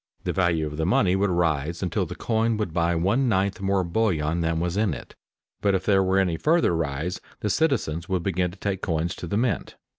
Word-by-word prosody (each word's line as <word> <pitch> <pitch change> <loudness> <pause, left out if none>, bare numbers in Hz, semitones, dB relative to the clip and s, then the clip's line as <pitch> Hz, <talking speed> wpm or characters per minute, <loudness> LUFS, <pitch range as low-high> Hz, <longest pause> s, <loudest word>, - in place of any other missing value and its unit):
The - - -1
value 85 -4 +1
of 75 0 -6
the 80 - 0
money 95 -1 +3
would 100 +1 +1
rise 85 -1 0
until 95 +1 -1
the 90 - -7
coin 115 0 0
would 105 -7 -3
buy 85 0 +1
one 100 +10 +2
ninth 100 0 0
more 95 -1 +1
bullion 85 -4 0
than 80 0 0
was 85 +1 -1
in 100 -7 +1
it, - - -11 0.5
but 100 -1 +2
if 95 - -2
there 100 -2 +4
were 95 0 +2
any 90 -4 +2
further 160 - +2
rise 80 +3 -2 0.2
the 105 - 0
citizens 100 - 0
would 90 -3 0
begin 90 -1 0
to 90 - -13
take 95 -1 -2
coins 85 -1 -1
to 90 - -6
the 100 - -1
mint. 115 -5 -1
90 Hz, 220 wpm, -25 LUFS, 85-100 Hz, 0.5 s, there